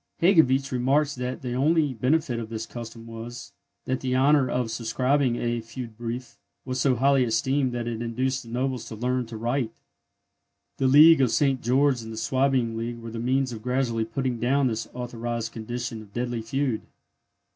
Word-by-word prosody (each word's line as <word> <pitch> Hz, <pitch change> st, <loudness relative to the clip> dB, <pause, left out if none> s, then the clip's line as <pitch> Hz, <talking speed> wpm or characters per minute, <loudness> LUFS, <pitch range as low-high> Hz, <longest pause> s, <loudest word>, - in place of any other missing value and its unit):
Hegewisch 140 Hz, -7 st, +4 dB
remarks 140 Hz, +4 st, +2 dB
that 125 Hz, 0 st, -4 dB
the 125 Hz, -1 st, -3 dB
only 150 Hz, +2 st, +2 dB
benefit 125 Hz, +1 st, +1 dB
of 110 Hz, -2 st, -6 dB
this 115 Hz, -1 st, -4 dB
custom 115 Hz, -1 st, -9 dB
was, 115 Hz, +1 st, -8 dB, 0.3 s
that 130 Hz, 0 st, -1 dB
the 130 Hz, -1 st, -1 dB
honour 135 Hz, 0 st, +4 dB
of 125 Hz, -2 st, -1 dB
subscribing 125 Hz, +3 st, +1 dB
a 120 Hz, -1 st, -1 dB
feud 115 Hz, 0 st, -8 dB
brief 120 Hz, +1 st, -6 dB, 0.3 s
was 130 Hz, -1 st, -2 dB
so 130 Hz, -1 st, +3 dB
highly 135 Hz, +2 st, +4 dB
esteemed 130 Hz, +3 st, +1 dB
that 120 Hz, -1 st, -3 dB
it 115 Hz, -1 st, -3 dB
induced 130 Hz, +3 st, -1 dB
the 115 Hz, -, -13 dB
nobles 125 Hz, 0 st, -2 dB
to 110 Hz, -, -7 dB
learn 125 Hz, +2 st, -1 dB
to 115 Hz, -, -7 dB
write! 120 Hz, +2 st, -1 dB, 1.1 s
The 135 Hz, -, +2 dB
League 150 Hz, +3 st, +8 dB
of 130 Hz, -, +4 dB
St. 130 Hz, +3 st, +2 dB
George 130 Hz, +1 st, +2 dB
and 110 Hz, 0 st, -8 dB
the 110 Hz, -, -7 dB
Swabian 130 Hz, -2 st, +1 dB
League 115 Hz, +1 st, -4 dB
were 115 Hz, -1 st, -8 dB
the 115 Hz, -, -5 dB
means 130 Hz, +2 st, +1 dB
of 110 Hz, -, -7 dB
gradually 125 Hz, -2 st, 0 dB
putting 125 Hz, +1 st, -2 dB
down 135 Hz, +4 st, +2 dB
this 115 Hz, -3 st, -1 dB
authorized 120 Hz, -1 st, -4 dB
condition 120 Hz, 0 st, -5 dB
of 100 Hz, -2 st, -15 dB
deadly 120 Hz, -1 st, -2 dB
feud. 130 Hz, +1 st, -1 dB
125 Hz, 180 wpm, -26 LUFS, 115-135 Hz, 1.1 s, League